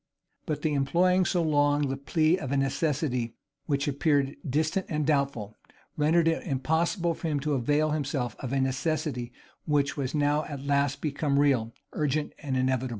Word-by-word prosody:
But 150 -2 -3
the 155 - +1
employing 175 +7 +3
so 175 -2 +1
long 145 -2 +2
the 135 - -1
plea 155 +4 +2
of 135 -6 -5
a 140 - +1
necessity 135 -4 -1 0.3
which 140 0 0
appeared 140 -1 +1
distant 155 +7 0
and 150 -2 -1
doubtful, 140 -8 -1 0.4
rendered 160 +2 +3
it 165 - +1
impossible 165 +5 0
for 165 - -5
him 150 -2 0
to 150 +1 -1
avail 145 +4 +1
himself 140 -6 -2
of 130 - -5
a 135 - +1
necessity 130 -1 -1 0.3
which 145 -1 +1
was 135 0 -2
now 145 +1 +2
at 140 -2 -7
last 140 -1 +1
become 145 -1 0
real, 130 -6 +2 0.2
urgent, 150 0 -1
and 135 -4 -2
inevitable. 130 0 0
145 Hz, 165 wpm, -28 LUFS, 135-155 Hz, 0.4 s, employing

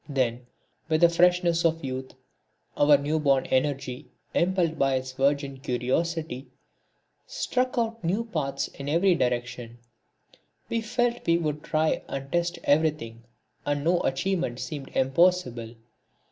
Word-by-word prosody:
Then, 125 -3 -1 0.4
with 155 0 +2
the 170 - +7
freshness 175 0 +3
of 165 -2 +1
youth, 130 0 -5 0.6
our 145 0 +6
new 150 +3 -1
born 140 -3 +2
energy, 130 0 -1 0.3
impelled 175 -2 +1
by 135 -1 +3
its 130 0 -3
virgin 140 +1 0
curiosity, 135 +2 -2 0.8
struck 255 0 -1
out 230 -2 -1
new 195 +8 0
paths 155 -11 -2
in 140 +1 -7
every 175 +5 +4
direction. 120 -4 -2 0.9
We 230 - 0
felt 240 +1 -1
we 170 0 +4
would 150 -3 -2
try 155 0 +1
and 135 0 -6
test 175 0 0
everything, 145 -7 0 0.4
and 145 0 -1
no 170 +2 +3
achievement 135 -2 -1
seemed 145 -4 -6
impossible. 135 -5 +2
150 Hz, 130 wpm, -26 LUFS, 130-170 Hz, 0.9 s, the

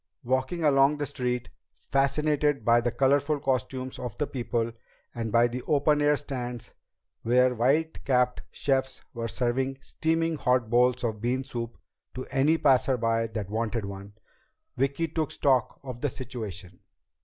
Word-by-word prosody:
Walking 130 +7 -1
along 140 0 +4
the 145 - -2
street, 125 -3 -3 0.3
fascinated 145 -1 +1
by 120 0 +5
the 120 - 0
colorful 140 +3 +2
costumes 130 -1 -2
of 120 -5 -6
the 150 - 0
people 120 -3 -2 0.4
and 115 -2 -3
by 120 +2 +5
the 125 +1 -5
open 150 0 +3
air 145 0 +4
stands 125 -4 -6 0.5
where 125 +2 +3
white 140 +7 +1
capped 125 -2 +2
chefs 135 -1 -1
were 115 -2 -3
serving 130 +3 -1
steaming 160 +3 -1
hot 125 -4 +1
bowls 125 +1 +3
of 110 -3 -2
bean 125 +3 0
soup 120 -2 -5 0.4
to 130 - -5
any 145 +4 +3
passer 135 -3 +3
by 115 -1 +1
that 105 -3 -5
wanted 110 -1 -1
one, 100 +1 -8 0.6
Vicki 140 +5 0
took 160 -1 -2
stock 130 -3 +1
of 125 -3 -7
the 145 - +1
situation. 105 -9 -7
130 Hz, 150 wpm, -27 LUFS, 120-140 Hz, 0.6 s, by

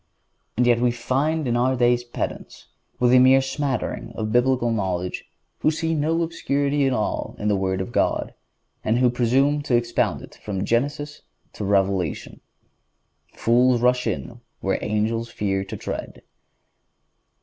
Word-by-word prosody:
And 125 - +3
yet 120 -1 +4
we 125 - +4
find 135 +6 -1
in 120 - +1
our 125 +2 +2
days 120 0 +2
pedants, 120 - -6 0.3
with 125 0 +4
a 130 - +8
mere 130 +1 +6
smattering 135 -1 -3
of 110 -1 -3
Biblical 125 0 +2
knowledge, 90 -4 -2 0.3
who - - +3
see 165 +1 -1
no 160 +2 +1
obscurity 145 -3 0
at - - +1
all 110 -4 -2
in 105 - -1
the 105 - +3
Word 95 -1 -1
of 95 - -5
God, - - 0 0.5
and 110 +2 +1
who 125 -1 +3
presume 135 +5 +2
to 140 -4 0
expound 120 0 0
it - - -12
from 100 -2 -3
Genesis 145 +6 -1 0.3
to - - -6
Revelation. 95 -5 0 0.9
"Fools 125 +1 +3
rush 125 +1 +2
in 120 -1 -4 0.2
where 95 - -1
angels 110 +2 -1
fear 95 -3 -1
to - - -7
tread." - - -6
120 Hz, 150 wpm, -23 LUFS, 110-135 Hz, 0.9 s, a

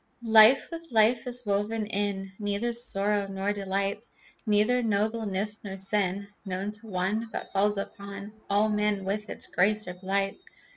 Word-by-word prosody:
Life 220 +5 +8
with 335 0 -7
life 230 +1 +3
is 250 0 -3
woven 210 +2 0
in. 200 -2 -2
Neither 205 +3 -1
sorrow 205 -4 0
nor 195 +1 -2
delight, 195 +1 -2 0.4
Neither 215 +4 +3
nobleness 210 -1 -1
nor 195 -2 -6
sin, 195 0 0 0.2
Known 195 +1 -3
to 210 +1 -12
one 205 +4 -1
But - - -6
falls 205 +1 +2
upon 200 +1 -7 0.2
All 205 +2 +3
men 210 -2 0
with 210 +2 -2
its - - -2
grace 210 +3 +2
or 180 - -4
blight. 195 - -1
205 Hz, 150 wpm, -27 LUFS, 195-215 Hz, 0.4 s, Life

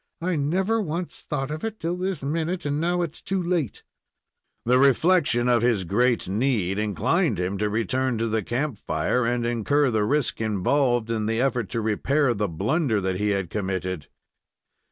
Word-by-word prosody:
"I 180 +1 -1
never 185 +10 +1
once 170 -1 -4
thought 135 -2 -3
of 155 +1 -5
it 220 -1 -4
till 170 +2 -2
this 185 -3 -3
minute, 165 +5 -2
and 145 +1 -1
now 175 +1 +1
it's 165 -1 -5
too 190 0 -1
late!" 170 - -1 0.8
The 125 +2 +4
reflection 140 -2 +3
of 120 -2 +3
his 115 -5 +2
great 120 +6 +1
need 105 -2 0
inclined 125 - +1
him 95 +2 -2
to 105 0 +1
return 125 +3 0
to 115 +1 0
the 110 0 0
camp 120 +2 -2
fire 115 +10 0
and 120 0 0
incur 125 +4 +1
the 110 -2 +1
risk 140 +2 0
involved 115 +3 +1
in 110 -2 -1
the 115 +1 0
effort 125 -2 0
to 115 - -2
repair 125 +5 +1
the 105 -1 -1
blunder 110 - 0
that 95 -1 -1
he 105 +2 0
had 95 -4 -1
committed. 95 -5 -3
125 Hz, 175 wpm, -25 LUFS, 105-155 Hz, 0.8 s, The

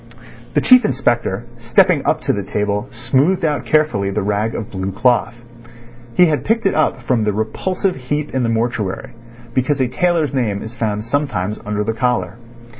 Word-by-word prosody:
The - - +4
Chief 255 -1 +7
Inspector, 120 - 0
stepping 140 +7 +3
up - - +1
to - - 0
the 100 - -2
table, 105 +2 -2
smoothed 140 +9 +1
out 150 -2 -1
carefully 150 -11 +2
the 100 +1 -2
rag 105 +2 -1
of 115 0 -5
blue 95 0 -3
cloth. 120 +2 +1 0.8
He 180 - +7
had 155 -3 0
picked 225 0 0
it 195 - +3
up 145 -5 0
from 120 -3 +1
the 105 -1 0
repulsive 180 - -1
heap 145 +3 -3
in 130 - 0
the 115 - +1
mortuary, 115 -3 -2 0.4
because 135 +3 +1
a 130 - +2
tailor's 165 +2 0
name 110 -7 -1
is 110 +2 -8
found 105 -3 -2
sometimes 115 -6 -2
under 105 0 -1
the 115 +2 -1
collar. 115 -5 -1
120 Hz, 180 wpm, -18 LUFS, 105-145 Hz, 0.8 s, Chief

